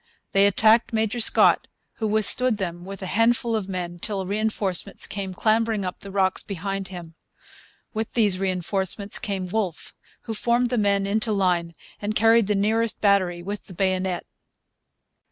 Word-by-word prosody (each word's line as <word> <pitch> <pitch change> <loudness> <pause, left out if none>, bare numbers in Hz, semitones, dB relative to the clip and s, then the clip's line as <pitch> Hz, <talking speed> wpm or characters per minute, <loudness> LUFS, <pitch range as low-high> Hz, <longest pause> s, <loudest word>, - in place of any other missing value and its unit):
They 195 +1 +5
attacked 225 +2 +4
Major 220 +1 0
Scott, 225 - +4 0.3
who 220 - -1
withstood 220 +3 +3
them 175 -3 -5
with 195 +1 -8
a - - -3
handful 230 +3 +1
of 200 -3 -3
men 175 -2 -5
till 195 -1 -3
reinforcements 200 -1 0
came 195 -2 -4
clambering 220 +1 +1
up 180 - -5
the 200 - -10
rocks 190 -1 0
behind 195 0 -4
him. 175 -3 -9 0.8
With 220 0 -4
these 205 -6 +2
reinforcements 190 +1 -1
came 195 -3 -3
Wolfe, 185 -3 -3 0.3
who 225 - -5
formed 240 +2 +1
the 245 - +1
men 200 -1 +2
into 215 +3 0
line 180 -4 0 0.3
and 210 +1 -3
carried 225 0 +4
the 210 - +1
nearest 220 +3 0
battery 185 -4 +2
with 200 +3 -6
the 185 - -12
bayonet. 185 -1 -1
200 Hz, 155 wpm, -24 LUFS, 185-220 Hz, 0.8 s, They